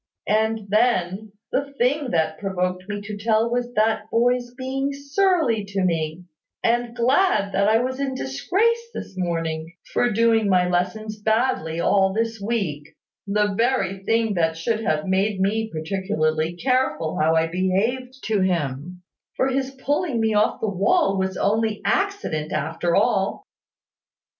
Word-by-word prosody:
And 220 +1 +1
then, 210 -2 +1 0.2
the 280 +1 -1
thing 270 +3 +1
that 160 -4 0
provoked 185 -1 -2
me 205 0 -3
to 205 +1 -6
tell 220 +2 +1
was 245 0 -1
that 220 0 +1
boy's 245 +1 +1
being 270 +2 -2
surly 280 - +1
to 195 -1 -2
me, 165 -1 -1 0.4
and 240 0 +1
glad 250 - +2
that 200 +1 +2
I 220 - +5
was 260 +1 -3
in 270 -1 -2
disgrace 390 - 0
this 195 - -7
morning, 165 -2 -3 0.2
for 245 - +2
doing 225 -1 +3
my 180 -1 +3
lessons 195 +5 -2
badly 220 -7 0
all 190 +2 +3
this 225 0 -2
week, 165 -9 -3 0.3
the 205 0 +1
very 195 -4 0
thing 225 0 +1
that 165 -3 0
should 215 +7 -1
have 155 -5 0
made 195 +1 +1
me 220 +3 0
particularly 160 -1 -1
careful 255 -7 0
how 160 +1 +3
I 160 0 +3
behaved 215 +10 -1
to 215 -3 0
him: 175 0 -2 0.3
for 260 - +1
his 265 0 -1
pulling 275 +1 -1
me 220 -1 +1
off 210 0 +2
the 220 - 0
wall 200 - +2
was 190 0 -1
only 220 +1 +1
accident, 390 - -1
after 165 +3 -1
all. 195 - +1
210 Hz, 150 wpm, -23 LUFS, 180-245 Hz, 0.4 s, I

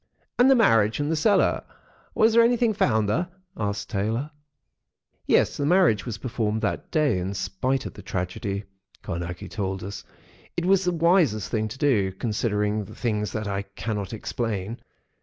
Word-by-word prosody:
"And 250 +2 +7
the 270 - +7
marriage? 115 - +4
And 145 +2 0
the - - +2
cellar—was 210 +4 +1
there 235 - +7
anything 235 -1 +3
found 110 - +2
there?" 160 - 0 0.3
asked 105 -1 -3
Taylor. 115 +8 -1 1.0
"Yes, - - +3
the 145 - -1
marriage 165 - +3
was 115 -2 -4
performed 110 -3 -2
that - - -2
day, 145 - +2
in 95 +2 -3
spite 100 +8 -1
of - - -6
the - - -11
tragedy," 95 +2 -3 0.4
Carnacki 85 +1 -5
told 95 -2 -3
us. 100 +2 -6 0.5
"It 170 - 0
was 190 0 +3
the 180 - +2
wisest 165 - +2
thing 110 -1 0
to 110 - -8
do—considering 105 -3 0
the 105 - -12
things 105 -5 -1
that 110 -1 -3
I 100 0 -1
cannot 100 0 -5
explain. 110 -1 -3
110 Hz, 160 wpm, -25 LUFS, 100-150 Hz, 1.0 s, And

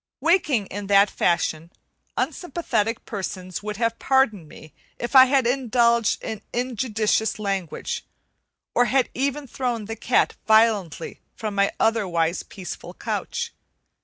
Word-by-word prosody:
Waking 315 - +2
in 200 +1 -6
that 200 0 +5
fashion, 170 -1 0 0.5
unsympathetic 245 - -1
persons 185 -3 -5
would 210 -1 -5
have 230 0 0
pardoned 245 - +2
me 155 - -14 0.2
if 240 +3 -4
I 260 -1 +11
had 265 -1 +2
indulged 235 -2 +2
in 220 -2 -5
injudicious 225 -3 0
language, 195 -5 -3 0.7
or 245 - +4
had 260 +1 +2
even 280 +2 -1
thrown 240 -4 -3
the 225 +2 -5
cat 230 +2 +1
violently 220 -7 +2 0.2
from 215 -2 -4
my 200 0 +2
otherwise 180 -7 +1
peaceful 185 -3 -8
couch. 470 0 -3
225 Hz, 125 wpm, -24 LUFS, 200-250 Hz, 0.7 s, I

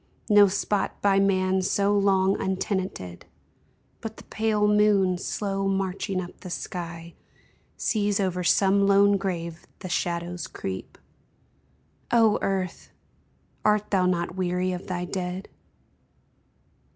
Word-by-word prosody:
No 205 -1 +8
spot 200 +1 -1
by 195 -1 +4
man 190 -1 +2
so 200 +2 +1
long 195 -1 +3
untenanted. 190 - -3 0.7
But 225 -1 -7
the - - -11
pale 215 -1 0
moon, 205 -3 +3
slow 195 0 -2
marching 195 0 -1
up 175 -1 -7
the 185 - -9
sky, 170 -2 -6 0.6
Sees 205 -2 0
over 180 -2 -1
some 195 +2 +3
lone 200 0 +5
grave 170 -4 -4
the 185 - -8
shadows 170 +1 -2
creep! 95 -1 -6 1.1
O 225 -3 +4
Earth! 190 -2 -2 0.7
art 210 0 +2
thou 185 -2 +3
not 175 -1 -1
weary 180 0 0
of 180 0 -6
thy 180 -1 -3
dead 180 +1 -4
190 Hz, 115 wpm, -26 LUFS, 180-200 Hz, 1.1 s, No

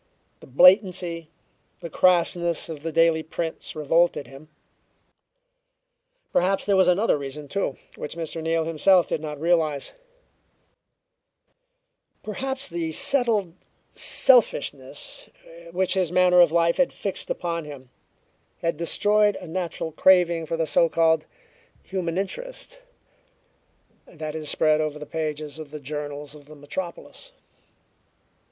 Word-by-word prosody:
The - - -15
blatancy, 175 - +3 0.5
the 170 - -7
crassness 170 -2 +2
of 155 -3 -7
the 165 +1 -4
daily 165 0 +3
prints 160 +1 -5
revolted 155 0 +1
him. 140 +3 -14 1.8
Perhaps 190 +2 +1
there 200 - +2
was 190 -1 +4
another 180 -2 +2
reason, 140 +1 -7
too, 170 -3 -3 0.2
which 150 - -7
Mr. 165 -1 -5
Neal 165 0 0
himself 170 +3 +3
did - - -3
not 150 -2 -6
realize; 160 -4 0 2.3
perhaps 265 +6 -3
the 165 -2 -4
settled 220 - +2 0.4
selfishness 145 - +1 0.4
which 185 +2 0
his 185 -4 0
manner 180 0 +5
of 170 -3 +5
life 170 0 +2
had 270 -1 +2
fixed 200 - -3
upon 170 -2 -3
him 135 -4 -11 0.7
had 165 -2 -1
destroyed 205 +5 +2
a - - -8
natural 165 -1 -4
craving 170 -1 +3
for 165 - -2
the 165 - 0
so 165 +2 +2
called 160 0 +2 0.6
"human 180 -3 -3
interest" - - -6 1.3
that 155 -2 -7
is 155 -2 -3
spread 155 -1 +2
over 155 -1 -3
the 150 - -8
pages 155 -1 -5
of 155 -2 -8
the 150 +1 -8
journals 145 0 -6
of 145 -2 -15
the 155 - -13
metropolis. 175 - -7
165 Hz, 125 wpm, -24 LUFS, 155-185 Hz, 2.3 s, manner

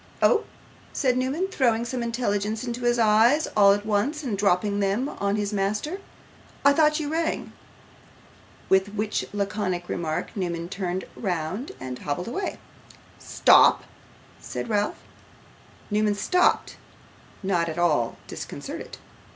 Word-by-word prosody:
'Oh!' 460 - +4 0.5
said 255 -3 +1
Newman, 265 +9 0
throwing 235 -8 +1
some 250 0 -3
intelligence 220 -2 -1
into 240 0 -4
his 240 0 +3
eyes 230 +7 +4
all 200 -2 +7
at 205 +1 0
once, 235 +9 0
and 240 -7 -2
dropping 200 +1 +1
them 200 +7 0
on 200 -7 -1
his 210 0 -2
master, 210 - -1 0.7
'I 280 - +7
thought 305 0 +3
you 300 - -3
rang.' 325 +2 -2 1.2
With 190 +2 +2
which 210 0 -1
laconic 195 -3 -2
remark 160 -2 -3
Newman 170 -3 -3
turned 190 -1 -3
round 185 - -3
and 130 -1 -6
hobbled 150 +5 -3
away. 385 +11 -3 0.6
'Stop!' - - +5 0.6
said - - -6
Ralph. 205 -1 -1 0.9
Newman 210 0 +2
stopped; 360 - +1 0.7
not 175 -3 +1
at 160 - -5
all 150 -9 +1
disconcerted. - - -7
210 Hz, 125 wpm, -25 LUFS, 190-250 Hz, 1.2 s, all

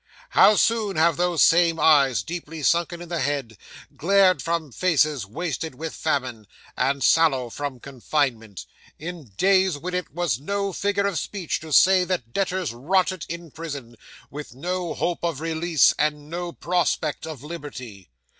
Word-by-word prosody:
How 210 +2 +6
soon 215 -3 +1
have 160 0 +3
those 175 -1 +2
same 165 -1 +4
eyes, 140 -5 +4
deeply 165 -2 -7
sunken 170 +2 +1
in 175 - -12
the 170 -1 -2
head, 140 -7 -2 0.4
glared 185 -2 +3
from 165 -1 -2
faces 150 - +1
wasted 160 - -4
with 160 +3 -6
famine, 130 -8 -2 0.3
and 135 +2 0
sallow 135 -7 +3
from 140 -2 -5
confinement, 125 - -3 0.3
in 170 -1 -7
days 190 -4 +3
when 180 +5 -6
it 180 0 -2
was 170 -8 -1
no 200 +5 -2
figure 200 +2 0
of 200 -5 0
speech 190 -6 -3
to 160 0 -10
say 185 +4 +6
that 175 -11 -3
debtors 185 -7 -1
rotted 185 +7 0
in 170 -1 -7
prison, 140 -7 -7 0.4
with 145 -2 -8
no 175 +4 -3
hope 175 -1 -2
of 165 -5 -1
release, 165 -1 +2
and 150 0 -1
no 175 0 -4
prospect 165 -3 -1
of 155 -5 -8
liberty! 130 - -9
160 Hz, 155 wpm, -24 LUFS, 140-180 Hz, 0.4 s, How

